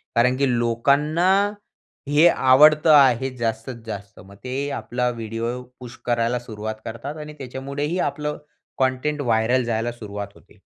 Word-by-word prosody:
कारण 125 Hz, +2 st, +3 dB
की 140 Hz, 0 st, +2 dB
लोकांना 140 Hz, +9 st, +2 dB, 0.8 s
हे 150 Hz, +4 st, +6 dB
आवडतं 150 Hz, +3 st, +5 dB
आहे 135 Hz, -2 st, +5 dB
जास्तीत 115 Hz, +1 st, -3 dB
जास्त 100 Hz, -1 st, -8 dB
मग 100 Hz, +1 st, -15 dB
ते 135 Hz, +3 st, -3 dB
आपला 125 Hz, -2 st, -2 dB
व्हिडिओ 115 Hz, +1 st, -4 dB, 0.2 s
पुश 120 Hz, -2 st, -10 dB
करायला 120 Hz, 0 st, 0 dB
सुरुवात 110 Hz, -2 st, -6 dB
करतात 125 Hz, +7 st, -6 dB
आणि 150 Hz, -, -9 dB
त्याच्यामुळेही 140 Hz, +5 st, -4 dB
आपलं 150 Hz, -1 st, -2 dB, 0.4 s
कंटेंट 130 Hz, +3 st, 0 dB
व्हायरल 120 Hz, 0 st, +2 dB
जायला 115 Hz, 0 st, -1 dB
सुरुवात 105 Hz, -3 st, -7 dB
होते. -, -, -21 dB
125 Hz, 135 wpm, -22 LUFS, 115-140 Hz, 0.8 s, हे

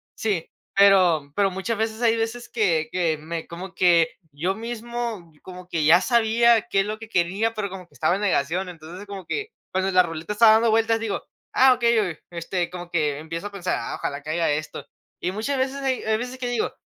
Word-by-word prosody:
Sí, 200 Hz, -7 st, -1 dB, 0.3 s
pero 185 Hz, -7 st, +5 dB
pero, 200 Hz, -1 st, +3 dB
muchas 190 Hz, +4 st, -3 dB
veces 220 Hz, +1 st, -2 dB
hay 230 Hz, -1 st, +4 dB
veces, 230 Hz, +2 st, -3 dB
que 165 Hz, -9 st, +1 dB
que 170 Hz, -4 st, 0 dB
me 160 Hz, +2 st, -6 dB
como 180 Hz, +2 st, -8 dB
que, 170 Hz, -2 st, +4 dB, 0.2 s
yo 170 Hz, +7 st, -1 dB
mismo, 230 Hz, -4 st, -5 dB
como 180 Hz, -1 st, -10 dB
que 160 Hz, -3 st, 0 dB
ya 170 Hz, +4 st, +7 dB
sabía, 235 Hz, -1 st, +4 dB
qué 195 Hz, -, +3 dB
es -, -, -2 dB
lo 215 Hz, +1 st, -4 dB
que 225 Hz, -, -9 dB
quería, 195 Hz, +5 st, 0 dB
pero, 205 Hz, -2 st, -2 dB
como 185 Hz, -2 st, -9 dB
que -, -, -29 dB
estaba 155 Hz, +6 st, +1 dB
en 200 Hz, -, -4 dB
negación. 180 Hz, -1 st, 0 dB
Entonces, 175 Hz, +4 st, -10 dB
como 195 Hz, -2 st, -8 dB
que, 430 Hz, -, -3 dB, 0.2 s
cuando 190 Hz, +1 st, 0 dB
la 185 Hz, -1 st, +6 dB
ruleta 165 Hz, +3 st, -5 dB
estaba 220 Hz, +1 st, +7 dB
dando 225 Hz, +1 st, +4 dB
vueltas, 225 Hz, 0 st, +2 dB
digo: 220 Hz, -3 st, -3 dB, 0.3 s
"Ah, 260 Hz, 0 st, +6 dB
okey, 235 Hz, -1 st, +2 dB
o -, -, +3 dB, 0.3 s
este, 170 Hz, +1 st, -2 dB
como 175 Hz, -1 st, -8 dB
que 150 Hz, -4 st, 0 dB
empiezo 165 Hz, +5 st, -5 dB
a -, -, -10 dB
pensar, 190 Hz, -3 st, -2 dB
ah, -, -, -4 dB
ojalá 140 Hz, 0 st, -4 dB
caiga 155 Hz, +2 st, 0 dB
esto". 155 Hz, +1 st, -4 dB, 0.4 s
Y 180 Hz, -, -1 dB
muchas 220 Hz, +8 st, -2 dB
veces, 265 Hz, +1 st, -1 dB
hay 265 Hz, -2 st, 0 dB, 0.2 s
veces 250 Hz, +3 st, -5 dB
que 255 Hz, -1 st, -3 dB
digo: 240 Hz, -2 st, -1 dB
195 Hz, 210 wpm, -24 LUFS, 170-225 Hz, 0.4 s, ya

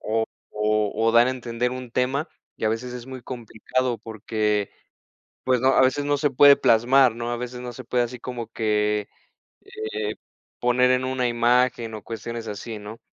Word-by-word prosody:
o 110 Hz, +1 st, 0 dB, 0.3 s
o 105 Hz, 0 st, +1 dB
o 115 Hz, 0 st, +1 dB
dar 120 Hz, +1 st, +6 dB
a -, -, +2 dB
entender 120 Hz, -1 st, -2 dB
un 125 Hz, -1 st, -7 dB
tema 135 Hz, +5 st, 0 dB, 0.3 s
y -, -, -5 dB
a 110 Hz, -, +3 dB
veces 120 Hz, +3 st, -3 dB
es 125 Hz, 0 st, -8 dB
muy 130 Hz, -1 st, -8 dB
complicado 120 Hz, 0 st, -3 dB
porque, 105 Hz, -1 st, -2 dB, 0.7 s
pues, 130 Hz, -2 st, +2 dB
no, 130 Hz, -, +4 dB
a 135 Hz, -, +4 dB
veces 130 Hz, +2 st, +2 dB
no 145 Hz, 0 st, +1 dB
se 145 Hz, -1 st, +1 dB
puede 140 Hz, +2 st, +7 dB
plasmar, 120 Hz, +2 st, +4 dB
¿no? 120 Hz, 0 st, -3 dB
A 120 Hz, -, -1 dB
veces 125 Hz, 0 st, -6 dB
no 125 Hz, 0 st, -6 dB
se 130 Hz, +2 st, -9 dB
puede 125 Hz, 0 st, +1 dB
así 125 Hz, +1 st, -7 dB
como 120 Hz, -3 st, -6 dB
que, 105 Hz, -2 st, 0 dB, 0.5 s
eh, 110 Hz, 0 st, -5 dB, 0.4 s
poner 125 Hz, +1 st, +3 dB
en 130 Hz, 0 st, +2 dB
una 130 Hz, -1 st, 0 dB
imagen 120 Hz, -1 st, +2 dB
o 105 Hz, -, -7 dB
cuestiones 115 Hz, 0 st, -6 dB
así, 105 Hz, +1 st, -6 dB
¿no? 105 Hz, +2 st, -9 dB
120 Hz, 185 wpm, -24 LUFS, 110-125 Hz, 0.7 s, puede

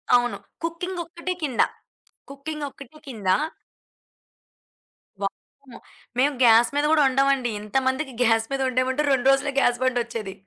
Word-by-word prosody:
అవును. 245 Hz, 0 st, +1 dB, 0.3 s
కుకింగ్ 345 Hz, +2 st, -4 dB
ఒక్కటే 345 Hz, +2 st, -5 dB
కింద. 260 Hz, -6 st, +1 dB, 0.7 s
కుకింగ్ 295 Hz, +2 st, -6 dB
ఒక్కటే 275 Hz, +2 st, -14 dB
కింద. 225 Hz, -7 st, -8 dB, 2.0 s
వామ్మో! 245 Hz, +6 st, -7 dB, 0.4 s
మేము 285 Hz, +3 st, +3 dB
గ్యాస్ 230 Hz, 0 st, +6 dB
మీద 290 Hz, +1 st, +2 dB
కూడా 315 Hz, -1 st, +5 dB
వండం 270 Hz, +1 st, +2 dB
అండి. 255 Hz, -3 st, -2 dB
ఇంతమందికి 260 Hz, +5 st, -1 dB
గ్యాస్ 225 Hz, -1 st, +3 dB
మీద 275 Hz, 0 st, -1 dB
వండమంటే 260 Hz, +3 st, 0 dB
2 260 Hz, -1 st, +1 dB
రోజులే 275 Hz, +1 st, +1 dB
గ్యాస్ 245 Hz, -2 st, +2 dB
బండొచ్చేది. 235 Hz, -5 st, -2 dB
260 Hz, 125 wpm, -24 LUFS, 240-290 Hz, 2.0 s, గ్యాస్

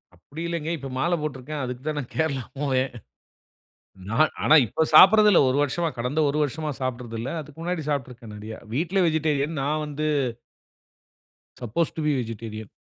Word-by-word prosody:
அப்டி 140 Hz, -, -10 dB
இல்லங்க, 165 Hz, -2 st, -3 dB
இப்ப 135 Hz, -1 st, -7 dB
மாலை 175 Hz, +4 st, +2 dB
போட்ருக்கேன். 150 Hz, 0 st, -4 dB
அதுக்கு 125 Hz, 0 st, -5 dB
தான் 155 Hz, -, -1 dB
நான் 125 Hz, -, -7 dB
கேரளா 140 Hz, -6 st, 0 dB, 0.2 s
போவேன். 135 Hz, -2 st, 0 dB, 1.2 s
நான் 155 Hz, +7 st, +3 dB
ஆனா, 155 Hz, -, +6 dB
இப்ப 160 Hz, +8 st, 0 dB
சாப்ட்றது 210 Hz, +5 st, +9 dB
இல்ல. 185 Hz, -, +6 dB
1 130 Hz, -, 0 dB
வருஷமா, 165 Hz, +4 st, 0 dB
கடந்த 125 Hz, +6 st, -1 dB
1 150 Hz, -, -3 dB
வருஷமா 150 Hz, +2 st, -2 dB
சாப்ட்றது 125 Hz, -3 st, -4 dB
இல்ல. 130 Hz, +4 st, -4 dB
அதுக்கு 150 Hz, +2 st, -12 dB
முன்னாடி 175 Hz, -3 st, -2 dB
சாப்பிட்ருக்கேன் 125 Hz, -6 st, -4 dB
நெறயா. 110 Hz, +1 st, -8 dB, 0.2 s
வீட்ல 175 Hz, +7 st, +1 dB
வெஜிடேரியன். 155 Hz, -1 st, 0 dB
நான் 150 Hz, +2 st, 0 dB
வந்து 150 Hz, +1 st, -2 dB, 1.5 s
சப்போஸ் 125 Hz, +8 st, -1 dB
டூ 160 Hz, -, -3 dB
பி 150 Hz, -, +3 dB
வெஜிடேரியன். 110 Hz, -2 st, -6 dB
145 Hz, 160 wpm, -25 LUFS, 125-160 Hz, 1.5 s, சாப்ட்றது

